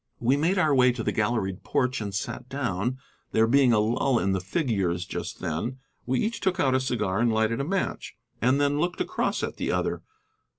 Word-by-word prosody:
We 125 Hz, +3 st, +3 dB
made 165 Hz, +7 st, +1 dB
our 155 Hz, -5 st, +3 dB
way 125 Hz, -1 st, +5 dB
to 120 Hz, -2 st, -4 dB
the -, -, 0 dB
galleried 105 Hz, -4 st, -1 dB
porch 130 Hz, -2 st, 0 dB
and 100 Hz, -1 st, -3 dB
sat 120 Hz, +5 st, -4 dB
down, 125 Hz, -3 st, -2 dB, 0.4 s
there 110 Hz, -, +4 dB
being 130 Hz, +2 st, +4 dB
a 115 Hz, -, +4 dB
lull 120 Hz, +4 st, +2 dB
in 95 Hz, -3 st, +1 dB
the 95 Hz, -, +1 dB
figures 95 Hz, -, -1 dB
just -, -, -6 dB
then. 110 Hz, +12 st, -3 dB, 0.3 s
We 130 Hz, 0 st, +1 dB
each 230 Hz, +2 st, -1 dB
took 190 Hz, -2 st, 0 dB
out 135 Hz, -6 st, +3 dB
a 130 Hz, -, +3 dB
cigar 105 Hz, -7 st, -1 dB
and 120 Hz, 0 st, +3 dB
lighted 110 Hz, +3 st, +1 dB
a -, -, -1 dB
match; 185 Hz, +6 st, -2 dB, 0.3 s
and 130 Hz, +4 st, +3 dB
then 145 Hz, 0 st, +2 dB
looked 175 Hz, +3 st, -1 dB
across -, -, -1 dB
at -, -, -3 dB
the -, -, -1 dB
other. -, -, -1 dB
125 Hz, 210 wpm, -26 LUFS, 105-140 Hz, 0.4 s, way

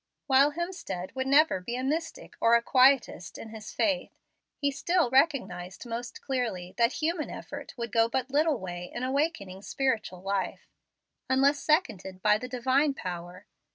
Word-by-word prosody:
While 275 Hz, +2 st, +4 dB
Hemstead 330 Hz, -, -5 dB
would 260 Hz, 0 st, -2 dB
never 285 Hz, -5 st, +4 dB
be 235 Hz, +7 st, -5 dB
a 255 Hz, -, -3 dB
Mystic 315 Hz, +5 st, -3 dB
or 230 Hz, +1 st, +6 dB
a 235 Hz, -, +4 dB
Quietest 255 Hz, -, +3 dB
in 225 Hz, -, -9 dB
his 220 Hz, +1 st, -9 dB
faith, 285 Hz, -4 st, 0 dB, 0.5 s
he 285 Hz, -1 st, 0 dB
still 340 Hz, -1 st, +1 dB
recognized 260 Hz, -, +1 dB
most 235 Hz, +1 st, -6 dB
clearly 225 Hz, -10 st, -2 dB
that 235 Hz, +3 st, +4 dB
human 320 Hz, 0 st, -1 dB
effort -, -, -8 dB
would 235 Hz, -2 st, -4 dB
go 230 Hz, 0 st, +3 dB
but 260 Hz, +2 st, -2 dB
little 300 Hz, 0 st, +2 dB
way 180 Hz, -3 st, -6 dB
in 240 Hz, -, -5 dB
awakening 260 Hz, -, -1 dB
spiritual 215 Hz, -7 st, -2 dB
life, 195 Hz, -1 st, -3 dB, 0.6 s
unless 275 Hz, +2 st, +3 dB
seconded 195 Hz, -, 0 dB
by 210 Hz, 0 st, +4 dB
the 250 Hz, -, -6 dB
Divine 265 Hz, +3 st, +1 dB
power. 180 Hz, 0 st, -7 dB
255 Hz, 155 wpm, -28 LUFS, 200-280 Hz, 0.6 s, or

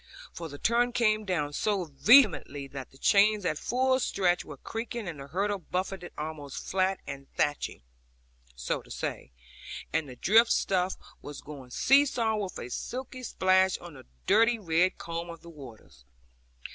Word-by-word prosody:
For 165 Hz, -1 st, -6 dB
the 145 Hz, -, -9 dB
torrent 240 Hz, +6 st, +1 dB
came 215 Hz, -2 st, +2 dB
down 150 Hz, -6 st, -1 dB
so 200 Hz, +3 st, 0 dB
vehemently 165 Hz, -, +4 dB
that 135 Hz, -2 st, -8 dB
the 135 Hz, -, -19 dB
chains 205 Hz, +5 st, +4 dB
at 155 Hz, -3 st, 0 dB
full 260 Hz, +1 st, +1 dB
stretch 180 Hz, -7 st, +1 dB
were 145 Hz, -, -10 dB
creaking, 225 Hz, -, -5 dB
and 160 Hz, -4 st, -6 dB
the 135 Hz, -, -8 dB
hurdle 200 Hz, +6 st, -1 dB
buffeted 185 Hz, +1 st, -4 dB
almost 150 Hz, -2 st, -6 dB
flat, 190 Hz, 0 st, +1 dB
and 140 Hz, 0 st, -8 dB
thatched 145 Hz, 0 st, 0 dB, 0.9 s
(so 60 Hz, +1 st, -2 dB
to -, -, -20 dB
say) 65 Hz, -, -5 dB, 0.6 s
with 155 Hz, -, 0 dB
the 130 Hz, -, -9 dB
drift 225 Hz, -, +4 dB
stuff, 185 Hz, -1 st, +1 dB, 0.3 s
was 145 Hz, -1 st, -8 dB
going 140 Hz, -4 st, -10 dB
see 275 Hz, -, +4 dB
saw, 225 Hz, -4 st, 0 dB
with 200 Hz, -3 st, -4 dB
a 120 Hz, -, -7 dB
sulky 255 Hz, -, -5 dB
splash 190 Hz, -5 st, +2 dB
on 175 Hz, -2 st, -11 dB
the 135 Hz, -, -14 dB, 0.2 s
dirty 230 Hz, +3 st, +4 dB
red 180 Hz, -2 st, +1 dB
comb 170 Hz, +1 st, -5 dB
of 170 Hz, -1 st, -9 dB
the 170 Hz, -, -11 dB
waters. 110 Hz, -, -13 dB
185 Hz, 165 wpm, -29 LUFS, 150-215 Hz, 0.9 s, vehemently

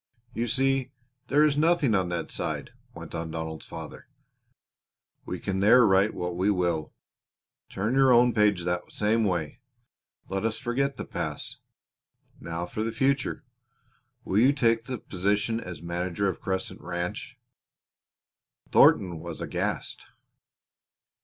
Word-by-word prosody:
"You 115 Hz, +2 st, -1 dB
see 135 Hz, +2 st, +1 dB, 0.3 s
there 145 Hz, +3 st, +4 dB
is 150 Hz, -2 st, +3 dB
nothing 160 Hz, -6 st, +3 dB
on 95 Hz, -3 st, +1 dB
that 85 Hz, -2 st, -3 dB
side," -, -, -3 dB, 0.2 s
went -, -, -9 dB
on 80 Hz, -1 st, -4 dB
Donald's 80 Hz, -1 st, -5 dB
father. -, -, -9 dB, 1.2 s
"We -, -, -4 dB
can 95 Hz, 0 st, -2 dB
there 115 Hz, +5 st, +6 dB
write 95 Hz, +1 st, +3 dB
what 90 Hz, -1 st, -3 dB
we 95 Hz, +3 st, +1 dB
will. 85 Hz, -5 st, 0 dB, 0.8 s
Turn 105 Hz, +6 st, -2 dB
your 135 Hz, -1 st, +5 dB
own 120 Hz, 0 st, +5 dB
page 105 Hz, -4 st, +3 dB
the 90 Hz, 0 st, 0 dB
same 110 Hz, +2 st, +1 dB
way. 90 Hz, -, -2 dB, 0.7 s
Let 95 Hz, +1 st, -3 dB
us 110 Hz, 0 st, 0 dB
forget 135 Hz, +3 st, -1 dB
the -, -, -5 dB
past. -, -, -4 dB, 0.8 s
Now 85 Hz, +1 st, -4 dB
for 100 Hz, +5 st, -5 dB
the 115 Hz, -, -1 dB
future! 135 Hz, +7 st, 0 dB, 0.8 s
Will 95 Hz, -, +1 dB
you 130 Hz, +5 st, +5 dB
take 115 Hz, -4 st, +2 dB
the 125 Hz, 0 st, -4 dB
position 105 Hz, +4 st, 0 dB
as 90 Hz, -5 st, -8 dB
manager 90 Hz, +3 st, -2 dB
of 95 Hz, -, -3 dB
Crescent 95 Hz, 0 st, -3 dB
Ranch?" 85 Hz, 0 st, -4 dB, 1.3 s
Thornton 85 Hz, -4 st, +5 dB
was 85 Hz, -1 st, -7 dB
aghast. -, -, -3 dB
105 Hz, 135 wpm, -27 LUFS, 90-120 Hz, 1.3 s, there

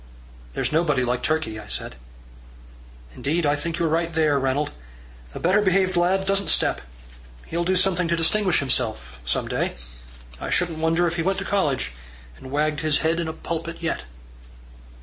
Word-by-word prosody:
"There's -, -, 0 dB
nobody 150 Hz, -5 st, +2 dB
like 125 Hz, 0 st, 0 dB
Turkey," 135 Hz, -9 st, -1 dB
I 105 Hz, -, -10 dB
said. 65 Hz, -, -2 dB, 1.2 s
"Indeed, 160 Hz, -, 0 dB
I 145 Hz, 0 st, +3 dB
think 165 Hz, +2 st, -3 dB
you're 170 Hz, -, +1 dB
right 165 Hz, +2 st, +1 dB
there, 155 Hz, -3 st, +2 dB
Ranald. 135 Hz, +2 st, 0 dB, 0.6 s
A -, -, -4 dB
better 190 Hz, +5 st, +3 dB
behaved 190 Hz, -1 st, +2 dB
lad 185 Hz, +2 st, +2 dB
doesn't 195 Hz, 0 st, +1 dB
step. -, -, +2 dB, 0.6 s
He'll 170 Hz, +1 st, -2 dB
do 185 Hz, +2 st, +1 dB
something 180 Hz, -1 st, +2 dB
to 170 Hz, -, +2 dB
distinguish 180 Hz, +2 st, +2 dB
himself 110 Hz, -, -1 dB
some -, -, 0 dB
day. -, -, -1 dB, 0.6 s
I -, -, -4 dB
shouldn't 170 Hz, -3 st, +1 dB
wonder 165 Hz, +2 st, +2 dB
if 170 Hz, +1 st, -1 dB
he -, -, +1 dB
went 190 Hz, +3 st, +1 dB
to 195 Hz, -, -3 dB
college, 145 Hz, -, 0 dB, 0.4 s
and 130 Hz, -, -11 dB
wagged 150 Hz, +1 st, 0 dB
his 155 Hz, -1 st, +2 dB
head 165 Hz, +1 st, +2 dB
in 170 Hz, -, -1 dB
a 160 Hz, -, -3 dB
pulpit 165 Hz, +1 st, -5 dB
yet." 165 Hz, -, -2 dB
165 Hz, 170 wpm, -24 LUFS, 145-175 Hz, 1.2 s, I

